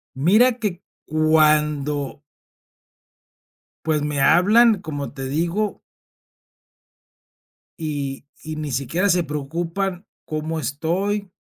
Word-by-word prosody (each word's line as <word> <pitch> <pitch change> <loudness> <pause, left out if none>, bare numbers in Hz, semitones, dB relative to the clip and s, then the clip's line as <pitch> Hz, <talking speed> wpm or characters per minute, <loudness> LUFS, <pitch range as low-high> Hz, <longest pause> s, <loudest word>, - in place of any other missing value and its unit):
Mira 220 - +4
que 200 -6 -3 0.2
cuando 150 -2 +2 1.6
Pues, 155 -2 +1
me 150 -1 -2
hablan, 205 +8 +5
como 145 -5 -5
te 135 -2 -6
digo 170 +8 -1 2.0
y 145 -4 -4 0.2
y 155 -1 -6
ni 150 -2 -4
siquiera 165 +10 0
se 180 -1 +3
preocupan 170 +6 -3 0.2
cómo 155 +1 -3
estoy, 185 +7 -2
155 Hz, 90 wpm, -22 LUFS, 150-185 Hz, 2.0 s, hablan